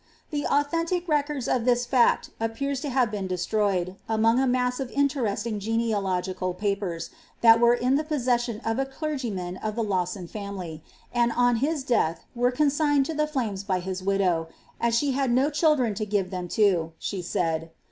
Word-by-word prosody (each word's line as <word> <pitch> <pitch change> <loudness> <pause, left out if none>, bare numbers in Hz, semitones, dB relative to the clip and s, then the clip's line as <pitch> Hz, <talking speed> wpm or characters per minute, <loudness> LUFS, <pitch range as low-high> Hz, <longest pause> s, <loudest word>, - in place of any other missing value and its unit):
The 290 -1 -1
authentic 330 +5 0
records 295 -4 0
of 245 - +1
this 245 0 +2
fact 245 -1 +3
appear 225 +5 -2
to 280 +2 -3
have 250 -4 +2
been 200 -3 -3
destroyed, 185 0 0
among 225 +2 +3
a 265 - +2
mass 250 0 +1
of 265 -2 -3
interesting 235 -7 0
genealogical 195 -4 -1
papers, 195 -4 -2 0.3
that 230 -1 +7
were 235 0 +5
in 250 +3 +2
the 305 - 0
possession 245 -6 0
of 225 +2 0
a 270 - +1
clei; 305 +3 -4
gyman 185 -6 -4
of 215 -1 -2
the 230 - 0
Lawson 185 -2 -1
family, 190 -6 -6 0.3
and 240 -1 +2
on 245 -1 +3
his 290 +3 0
death 195 -10 0
were 245 0 +2
consigned 290 +1 +2
to 320 - -3
the 305 0 0
flames 230 -10 -2
by 190 -2 0
his 185 +1 -4
widow, 185 -4 +1
^ - - -28 0.3
as 235 -1 +2
she 285 +2 +1
had 270 0 0
no 265 +5 +3
children 290 -7 +2
to 215 +2 -3
give 195 -2 0
them 180 -1 -4
to,'' 175 -5 +2
she 195 -3 -4
said. 165 -2 -1
230 Hz, 185 wpm, -26 LUFS, 195-270 Hz, 0.3 s, that